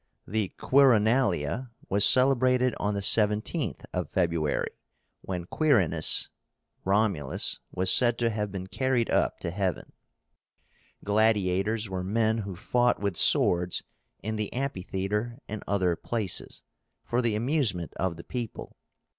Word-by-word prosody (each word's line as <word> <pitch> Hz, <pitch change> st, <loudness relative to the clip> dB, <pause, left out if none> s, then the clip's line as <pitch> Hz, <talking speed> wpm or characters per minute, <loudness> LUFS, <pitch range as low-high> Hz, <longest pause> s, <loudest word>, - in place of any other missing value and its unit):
The 105 Hz, -1 st, -2 dB
QUIRINALIA 120 Hz, -, +2 dB, 0.2 s
was 100 Hz, +1 st, +1 dB
celebrated 130 Hz, -1 st, +4 dB
on 105 Hz, 0 st, -1 dB
the 100 Hz, -, -2 dB
17th 105 Hz, -, +2 dB
of -, -, -3 dB
February, 85 Hz, -4 st, -1 dB, 0.5 s
when 90 Hz, -2 st, -5 dB
Quirínus 120 Hz, -, +2 dB, 0.5 s
(Romulus) 95 Hz, -8 st, 0 dB
was 95 Hz, 0 st, +2 dB
said 120 Hz, -2 st, +4 dB
to 115 Hz, -1 st, +1 dB
have 105 Hz, -2 st, -3 dB
been 95 Hz, -1 st, -5 dB
carried 125 Hz, +3 st, -1 dB
up -, -, +1 dB
to 85 Hz, -, -3 dB
heaven. 95 Hz, 0 st, -3 dB, 1.1 s
Gladiators 105 Hz, 0 st, +1 dB
were 95 Hz, -1 st, -4 dB
men 110 Hz, +3 st, 0 dB
who 100 Hz, -3 st, -5 dB
fought 120 Hz, +5 st, +1 dB
with 100 Hz, -3 st, -2 dB
swords 90 Hz, +1 st, +3 dB, 0.4 s
in 110 Hz, +1 st, -3 dB
the 105 Hz, -1 st, -3 dB
amphitheatre 105 Hz, -2 st, -3 dB
and 110 Hz, 0 st, -6 dB
other 95 Hz, -4 st, +1 dB
places, 105 Hz, 0 st, -4 dB, 0.4 s
for 120 Hz, +1 st, -1 dB
the 115 Hz, -3 st, 0 dB
amusement 115 Hz, -, -1 dB
of 85 Hz, -2 st, -2 dB
the 85 Hz, -, -9 dB
people. 120 Hz, -3 st, -7 dB
105 Hz, 125 wpm, -27 LUFS, 95-120 Hz, 1.1 s, celebrated